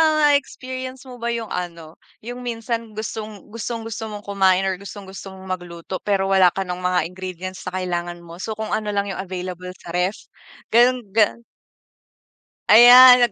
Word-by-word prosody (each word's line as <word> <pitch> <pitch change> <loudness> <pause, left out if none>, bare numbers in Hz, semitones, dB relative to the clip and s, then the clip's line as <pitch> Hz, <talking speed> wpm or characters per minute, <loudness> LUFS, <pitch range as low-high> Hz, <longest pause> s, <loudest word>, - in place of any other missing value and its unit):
na-experience 275 -4 +1
mo 250 -1 -10
ba 235 0 -3
yung 230 -2 -5
ano, 170 -2 -6 0.3
yung 245 +2 -6
minsan 230 -1 -4
gustong 215 -1 -6
gustong-gusto 225 0 -5
mong 205 0 -8
kumain 190 -2 +3
or 185 -1 -2
gustong-gusto 195 -1 -9
mong 190 0 -11
magluto, 175 +1 -7
pero 195 -1 +1
wala 190 -2 +6
ka 195 - -1
ng 180 -1 -4
mga 180 0 +2
ingredients 185 0 -7
na 185 - -7
kailangan 175 -1 -3
mo? 170 +1 -11
So, 220 +2 -3
kung 220 0 -5
ano 215 -1 -1
lang 200 0 -1
yung 190 - -4
available 180 -1 -6
sa 175 - -12
ref, 180 +3 0 0.6
gano'n, 250 +2 +5
gan 225 +2 +2 1.3
Ayan, 245 +1 +9
200 Hz, 160 wpm, -22 LUFS, 185-230 Hz, 1.3 s, Ayan